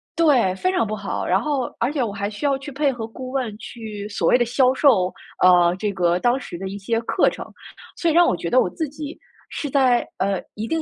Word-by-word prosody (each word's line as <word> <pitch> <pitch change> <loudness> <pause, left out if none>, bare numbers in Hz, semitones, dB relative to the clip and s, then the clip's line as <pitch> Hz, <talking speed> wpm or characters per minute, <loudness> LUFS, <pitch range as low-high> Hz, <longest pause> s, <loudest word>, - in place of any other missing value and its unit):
对， 270 - +3
非 370 - 0
常 360 - +2
不 215 0 -3
好。 200 -2 -4
然 185 - +2
后 285 -4 -1 0.2
而 240 +4 +1
且 280 -5 0
我 225 - -2
还 200 0 -3
需 215 +7 -6
要 280 -1 +2
去 280 +2 -9
配 280 +1 +1
合 230 -3 -6
顾 255 +3 -8
问 255 -6 -2
去 215 -2 -8
所 - - -1
谓 - - +5
的 245 - +2
销 255 +2 +3
售， 230 -10 +3 0.3
呃， 175 -1 +6
这 210 0 -1
个 175 -1 +1
当 245 +5 +2
时 175 - -8
的 190 +2 -5
一 195 +1 -6
些 225 +3 -1
课 235 - +2
程。 - - -8 0.5
所 340 - 0
以 - - 0
让 345 +1 +6
我 - - +2
觉 - - -4
得 - - +4
我 - - +2
自 320 -3 -3
己 300 +1 -8 0.3
是 290 - -4
在， 255 -3 +3
呃， 195 0 0
一 215 +2 -4
定 325 +4 -1
240 Hz, 265 characters per minute, -22 LUFS, 200-280 Hz, 0.5 s, 呃